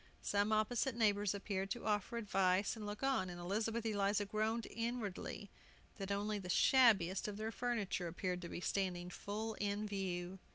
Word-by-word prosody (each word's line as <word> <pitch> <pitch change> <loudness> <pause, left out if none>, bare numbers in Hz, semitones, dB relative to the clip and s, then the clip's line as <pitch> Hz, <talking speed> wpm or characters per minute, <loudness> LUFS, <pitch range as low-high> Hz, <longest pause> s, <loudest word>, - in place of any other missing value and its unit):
Some 205 +1 +2
opposite 225 +4 +2
neighbors 205 -3 +2
appeared 195 -1 -2
to 240 - -4
offer 210 +2 0
advice 195 -2 +2
and 215 -2 -6
look 210 +4 -5
on, 265 -9 +2
and 175 0 -7
Elizabeth 220 +6 -1
Eliza 205 -1 +1
groaned 220 +3 0
inwardly 225 -3 -3 0.5
that 195 0 -3
only 205 +1 0
the 185 -2 -7
shabbiest 200 -6 +5
of 205 -1 -4
their 220 +1 -3
furniture 225 -7 -1
appeared 180 +1 -2
to 170 - -6
be - - -5
standing 180 -2 -1
full 215 +4 -4
in 205 +1 -1
view. 190 -2 -3
205 Hz, 165 wpm, -38 LUFS, 190-220 Hz, 0.5 s, shabbiest